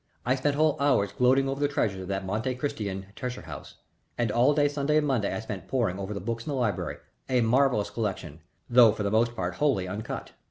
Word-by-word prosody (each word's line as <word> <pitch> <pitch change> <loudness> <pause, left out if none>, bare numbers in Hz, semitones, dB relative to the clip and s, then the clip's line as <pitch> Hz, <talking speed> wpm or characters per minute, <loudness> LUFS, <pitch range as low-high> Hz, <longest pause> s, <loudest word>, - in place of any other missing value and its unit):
I 125 - +3
spent 140 +2 0
whole 155 0 +2
hours 130 -9 +2
gloating 130 +4 +3
over 135 +1 -2
the 145 - +2
treasures 100 -9 -1
of 95 - -7
that 95 0 -3
Monte 110 +6 -2
Cristan 100 -8 -3
treasure 125 0 -5
house, - - -9 0.4
and 120 -3 0
all 125 +6 +3
day 145 -1 +4
Sunday 145 +1 0
and 155 - +2
Monday 125 -8 0
I 95 - -3
spent 100 -5 -7
poring 115 -8 0
over 100 +1 -4
the - - -3
books 115 +4 -4
in - - -2
the 145 - -1
library, 115 -7 -1 0.3
a 125 -2 +3
marvellous 120 -2 +2
collection, 95 -8 -4 0.3
though 120 -3 +7
for 110 - -4
the 100 - -1
most 115 +2 +2
part 90 -2 -2
wholly 135 -11 +1
uncut. 100 +4 -5
120 Hz, 225 wpm, -27 LUFS, 100-135 Hz, 0.4 s, though